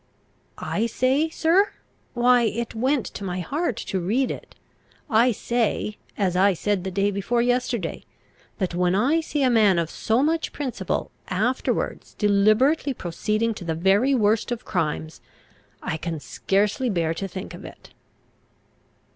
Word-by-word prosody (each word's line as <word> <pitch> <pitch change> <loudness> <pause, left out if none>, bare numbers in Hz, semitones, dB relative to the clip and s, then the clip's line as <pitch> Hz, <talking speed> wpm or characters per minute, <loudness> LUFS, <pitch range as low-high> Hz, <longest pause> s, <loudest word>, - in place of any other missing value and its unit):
"I 225 +3 -1
say, 265 +7 +1
sir? 340 +6 +2 0.4
why 245 0 +5
it 235 +1 -1
went 255 +3 +1
to - - -7
my 185 -1 -3
heart 280 - -2
to 190 - -2
read 225 +10 0
it. - - -9 0.6
I 230 +3 +5
say, 225 -2 -1 0.2
as 185 -4 0
I 190 +1 +4
said 200 +1 -1
the 190 - -3
day 200 +2 +1
before 235 +5 0
yesterday, 245 -6 -1 0.5
that 185 -3 -2
when 180 +1 +1
I 280 +11 +3
see 295 -3 -1
a 260 - +4
man 210 -6 +4
of 170 -1 -1
so 230 +4 +1
much 320 +2 0
principle 255 -10 -3 0.2
afterwards 220 +8 -1
deliberately 215 +8 +3
proceeding 215 +6 -1
to 200 - -9
the 165 -2 -2
very 200 +11 +3
worst 220 +1 +2
of 240 - -4
crimes, 160 -2 -2 0.6
I 155 - -2
can 165 -1 -4
scarcely 205 - 0
bear 165 -5 0
to 195 +4 -4
think 190 +1 -7
of - - -10
it." - - -12
215 Hz, 150 wpm, -24 LUFS, 190-250 Hz, 0.6 s, why